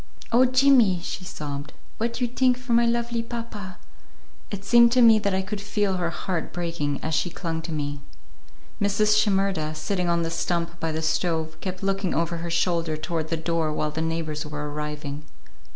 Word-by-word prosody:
"Oh, 245 +2 +6
Jimmy," 255 -7 +5
she 185 - -5
sobbed, 145 -4 -6 0.3
"what 230 +2 -1
you 245 - +2
tink 250 +1 +2
for 250 -1 -3
my 235 0 +5
lovely 235 0 0
papa!" 230 -5 -6 0.7
It 200 -1 -6
seemed 235 +1 +6
to 255 - +5
me 225 -2 +7
that 200 -2 0
I 190 - 0
could 205 +1 -5
feel 205 -2 0
her 175 -2 0
heart 175 0 -3
breaking 165 -5 -2
as 160 - -2
she 160 +3 +1
clung 165 -1 -4
to 165 - -6
me. 145 -2 -3 0.8
Mrs. 210 +1 +3
Shimerda, 195 -7 +1
sitting 180 +3 -1
on 170 0 +2
the 165 - -2
stump 170 0 -2
by 165 -1 -1
the 160 +1 -3
stove, 160 0 0
kept 185 0 -5
looking 195 -1 0
over 170 +1 0
her 170 +1 -4
shoulder 170 -2 0
toward 160 0 -3
the 165 - -1
door 160 -1 0
while 150 0 -1
the 160 - -3
neighbors 160 -2 -2
were 150 -1 -5
arriving. 150 -1 -5
175 Hz, 185 wpm, -25 LUFS, 160-210 Hz, 0.8 s, me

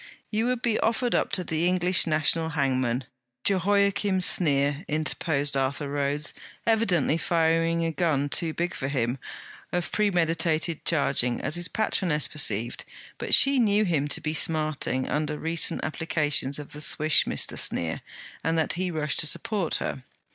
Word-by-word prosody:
'You 220 +2 0
would 250 -1 -2
be 230 -3 +1
offered 235 +2 0
up - - 0
to 185 -2 +3
the 165 0 -1
English 180 0 +3
national 160 +1 +2
hangman, 130 -4 0 0.4
Jehoiachim 200 0 +1
Sneer,' 145 -3 +2
interposed 150 -2 -1
Arthur 135 +2 -1
Rhodes, 145 +2 0 0.3
evidently 190 -9 +2
firing 165 0 +1
a 165 - -1
gun 155 -4 0
too 160 +3 -1
big 175 +2 -3
for 135 - -4
him, 130 -2 -1 0.5
of 175 -1 -2
premeditated 165 -5 0
charging, 140 -6 +1
as - - -3
his 175 +1 0
patroness 175 -8 0
perceived; 120 -5 -1 0.4
but - - +4
she 275 -1 +5
knew 210 -2 +3
him 155 -6 0
to 145 - 0
be 155 0 -2
smarting 155 -4 +1
under 150 0 -2
recent 165 +1 0
applications 150 -3 0
of 145 -1 -9
the 150 - -7
swish 155 0 +2
of - - -2
Mr. - - 0
Sneer, 85 -1 -1 0.4
and 165 0 0
that 160 - 0
he 180 +1 -2
rushed 150 -4 -1
to 155 - +2
support 205 -2 -2
her. 130 - -3
160 Hz, 155 wpm, -26 LUFS, 145-180 Hz, 0.5 s, she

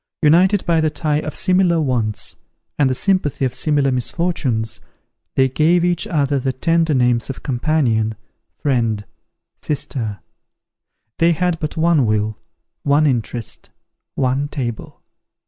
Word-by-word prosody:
United 180 +6 +4
by 165 -2 +2
the 155 - +2
tie 150 0 -1
of 155 0 -5
similar 180 -2 +2
wants, 120 -8 -1 0.4
and 140 -2 +4
the 130 - 0
sympathy 165 -5 +1
of 125 - -2
similar 145 -3 +1
misfortunes, 125 -5 -1 0.6
they 130 - +4
gave 165 +6 +2
each 175 -1 0
other 145 -4 +1
the 130 0 -1
tender 165 +3 +1
names 125 -1 +2
of 135 - -6
companion, 120 -5 +1 0.4
friend, 115 -7 0 0.5
sister. 115 -8 -3 1.0
They 170 +1 +4
had 175 0 0
but 155 +1 -4
one 160 -6 +3
will, 110 0 0 0.4
one 145 +2 +3
interest, 120 -4 -2 0.5
one 135 +2 0
table. 120 -6 -5
140 Hz, 130 wpm, -19 LUFS, 120-165 Hz, 1.0 s, United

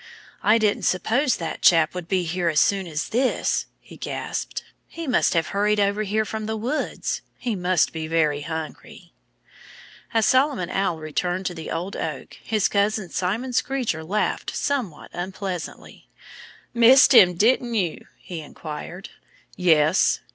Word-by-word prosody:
"I 215 +2 +4
didn't 215 -2 +1
suppose 245 +9 +1
that 165 -2 -5
chap 165 -3 +5
would 180 -2 -6
be 185 -1 +1
here 175 +1 -1
as 155 - +2
soon 195 -2 +2
as 155 -2 -3
this," 255 +3 0
he - - -15
gasped. - - -4 0.2
"He 335 - -7
must 255 - +2
have 165 -1 +1
hurried 210 +1 +1
over 200 +1 +1
here 215 +1 0
from 220 0 -5
the 220 0 -2
woods. 255 +8 -2 0.2
He 240 -4 -2
must 180 -2 +1
be 160 -1 -4
very 155 -3 +1
hungry." 160 +1 -7 1.0
As 225 -2 +2
Solomon 260 - +2
Owl 190 -4 0
returned 175 +4 -2
to 180 - -2
the 160 -2 -7
old 175 +4 -4
oak - - -5
his 215 -3 +1
cousin 200 -2 0
Simon 215 +8 -2
Screecher 240 -11 -1
laughed 200 +6 -2
somewhat 255 - -3
unpleasantly. 185 -1 -6 0.6
"Missed 255 +4 +7
him 180 -7 +7
didn't 235 +4 +2
you?" 180 -7 -2
he 170 -3 -8
inquired. 155 +4 -8 0.5
"Yes!" 160 -1 +3
190 Hz, 145 wpm, -23 LUFS, 165-220 Hz, 1.0 s, Missed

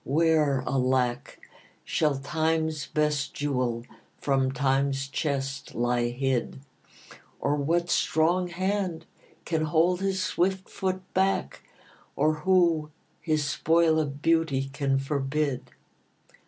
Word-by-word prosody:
where, 150 -3 +2
alack, 130 -2 0 0.5
Shall 150 -3 +1
Time's 160 +2 -1
best 150 -2 0
jewel 125 -5 -1 0.3
from 135 -2 +1
Time's 135 0 0
chest 135 -1 -3
lie 120 0 +1
hid? 130 0 -1 0.8
Or 145 +1 +1
what 170 +4 0
strong 175 +3 +2
hand 185 -2 -2 0.4
can 160 -2 0
hold 170 +4 +2
his 195 -1 0
swift 190 +1 0
foot 185 -1 -3
back? 190 - 0 0.5
Or 155 +2 +2
who 170 -4 +3 0.3
his 155 -3 0
spoil 160 +2 +3
of 145 -2 -3
beauty 160 -5 +1
can 140 -1 +1
forbid? 140 0 -2
150 Hz, 105 wpm, -27 LUFS, 135-165 Hz, 0.8 s, who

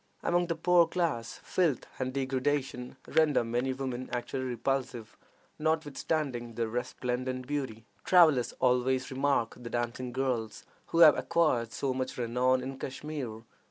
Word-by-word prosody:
Among 175 0 +2
the 170 - -1
poorer 170 +1 +4
classes 165 -10 -2
filth 165 -9 +1
and 130 0 -1
degradation 130 -1 -2
render 150 -6 +3
many 120 +3 -1
women 130 -1 -4
actually 125 +2 -3
repulsive, 125 -2 -2 0.4
notwithstanding 150 -5 -1
their 115 -1 -1
resplendent 125 +1 -3
beauty. 130 -6 -4 0.2
Travelers 155 -9 +5
always 130 +1 +2
remark 135 -3 +1
the 120 -1 -7
dancing 120 +1 -3
girls 120 -4 -2 0.2
who 165 - +2
have 155 -3 +9
acquired 130 -3 +1
so 135 +2 -1
much 130 0 -3
renown 125 +2 +1
in 135 0 -6
Kashmir. 135 -5 -5
130 Hz, 130 wpm, -30 LUFS, 120-145 Hz, 0.4 s, have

